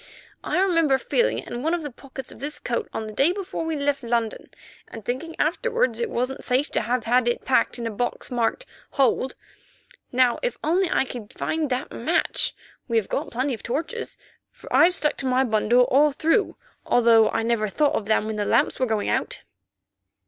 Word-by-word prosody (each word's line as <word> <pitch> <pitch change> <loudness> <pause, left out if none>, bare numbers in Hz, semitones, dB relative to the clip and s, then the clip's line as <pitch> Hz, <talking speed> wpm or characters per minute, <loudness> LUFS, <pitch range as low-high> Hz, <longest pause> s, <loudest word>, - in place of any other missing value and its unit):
I - - 0
remember 330 -7 +3
feeling 480 - +1
it - - -6
in 240 - -5
one 320 +5 +1
of 340 - -5
the 290 - -5
pockets 265 +1 -10
of - - -13
this 290 +4 -5
coat 240 - -3
on 220 - -4
the 215 - -7
day 275 +10 +3
before 380 -3 -4
we 325 -1 -2
left 285 -1 0
London, 230 -2 -2 0.4
and 225 -2 -10
thinking 320 +7 -4
afterwards 475 +9 0
it 470 -2 -1
wasn't 255 +2 -2
safe 260 +3 +1
to - - +1
have 240 +1 -1
had 245 +2 +2
it 240 - -1
packed 265 - +2
in 235 - -5
a 230 - -2
box 245 +4 -3
marked 245 - -1 0.3
'Hold.' 265 -1 +1 0.8
Now 250 -1 +3
if - - -2
only 355 +3 +2
I - - +2
could 240 -3 -8
find 315 -2 -2
that 255 +2 -2
match, - - 0 0.3
we 230 -2 +1
have 220 - 0
got - - -2
plenty 260 +3 0
of 225 - -6
torches, 330 - -4 0.3
for - - -11
I've 355 +2 +6
stuck 300 -4 +1
to 270 - -2
my 255 +1 +3
bundle 235 +1 +3
all 290 +4 +4
through, 325 +8 +1 0.3
although 230 -2 +5
I - - -1
never 225 -2 +1
thought 295 +7 +1
of 205 - -2
them 220 -1 +2
when 215 0 -3
the 210 - 0
lamps - - +2
were 255 - +1
going 220 -2 -1
out." - - -1
260 Hz, 205 wpm, -24 LUFS, 235-315 Hz, 0.8 s, I've